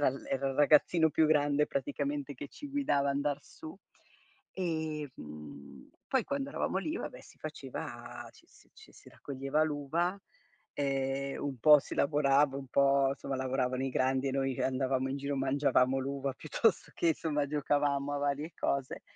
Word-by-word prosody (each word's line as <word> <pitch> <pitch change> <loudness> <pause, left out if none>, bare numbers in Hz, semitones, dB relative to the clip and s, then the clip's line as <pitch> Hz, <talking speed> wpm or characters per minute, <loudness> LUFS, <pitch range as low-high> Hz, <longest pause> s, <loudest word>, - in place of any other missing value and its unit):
era 140 -3 +3 0.2
era 135 0 0
il 135 - -3
ragazzino 155 +3 +5
più 155 +1 +3
grande 145 -1 +3
praticamente 145 +1 -2
che 140 +3 -8
ci 290 - -9
guidava 145 - +1
andar 145 +1 0
su. 160 +4 -11 0.8
E, 160 -5 -2
mhmm, 75 -3 -11 0.2
poi 260 -4 +2
quando 280 0 -3
eravamo 190 - -1
lì, 310 +11 -3
va - - -3
beh, - - -13
si - - -18
faceva - - -7
ci - - -20
si - - -23
ci 435 - -16
si - - -16
raccoglieva 135 +2 -2
l'uva, 160 +6 -1 0.6
ehm, 135 -1 -1
un 140 -3 -3
po' 150 +5 +8
si - - -7
lavorava, 140 -1 +3
un 135 - -8
po' 140 0 +4
insomma 135 0 -4
lavoravano 130 0 -1
i - - 0
grandi 130 +1 +1
e 130 - -2
noi 135 -1 -1
andavamo 130 0 0
in 135 - -2
giro, 140 0 -3
mangiavamo 135 -1 +2
l'uva 135 0 -2
piuttosto 185 - 0
che 165 -2 +2
somma 150 -3 -1
giocavamo 145 -1 0
a - - -1
varie 145 +3 -1
cose. 135 -2 -2
140 Hz, 165 wpm, -31 LUFS, 135-150 Hz, 0.8 s, po